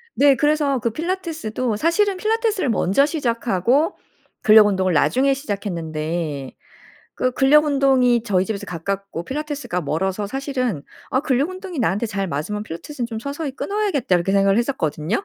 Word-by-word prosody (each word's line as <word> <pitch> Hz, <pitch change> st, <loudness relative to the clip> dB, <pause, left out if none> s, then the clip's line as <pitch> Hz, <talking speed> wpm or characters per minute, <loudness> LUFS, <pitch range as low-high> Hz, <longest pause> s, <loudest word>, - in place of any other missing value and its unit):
네. 280 Hz, -1 st, +5 dB
그래서 295 Hz, -1 st, +1 dB
그 235 Hz, -, 0 dB
필라테스도 315 Hz, -, -3 dB
사실은 380 Hz, -, +2 dB
필라테스를 435 Hz, -, 0 dB
먼저 220 Hz, +5 st, +3 dB
시작하고 245 Hz, -, 0 dB, 0.5 s
근력 215 Hz, -1 st, +7 dB
운동을 190 Hz, -3 st, +1 dB
나중에 265 Hz, -, +3 dB
시작했는데. 165 Hz, -, -4 dB, 0.6 s
그 255 Hz, -, +1 dB
근력 285 Hz, +4 st, +4 dB
운동이 265 Hz, -5 st, +3 dB
저희 190 Hz, -4 st, +1 dB
집에서 200 Hz, 0 st, -4 dB
가깝고 190 Hz, +1 st, -4 dB
필라테스가 290 Hz, -, -3 dB
멀어서 190 Hz, +7 st, -1 dB
사실은 255 Hz, -, -2 dB, 0.3 s
'아 260 Hz, -, +2 dB
근력 280 Hz, +1 st, +1 dB
운동이 370 Hz, -4 st, -7 dB
나한테 225 Hz, -1 st, 0 dB
잘 195 Hz, -2 st, -2 dB
맞으면 195 Hz, +8 st, -3 dB
필라테스는 235 Hz, -, -6 dB
좀 225 Hz, -2 st, -6 dB
서서히 280 Hz, +1 st, -4 dB
끊어야겠다.' 390 Hz, -, -2 dB
이렇게 175 Hz, +3 st, -1 dB
생각을 195 Hz, +1 st, +3 dB
했었거든요. 185 Hz, -, -1 dB
240 Hz, 395 characters per minute, -21 LUFS, 195-290 Hz, 0.6 s, 근력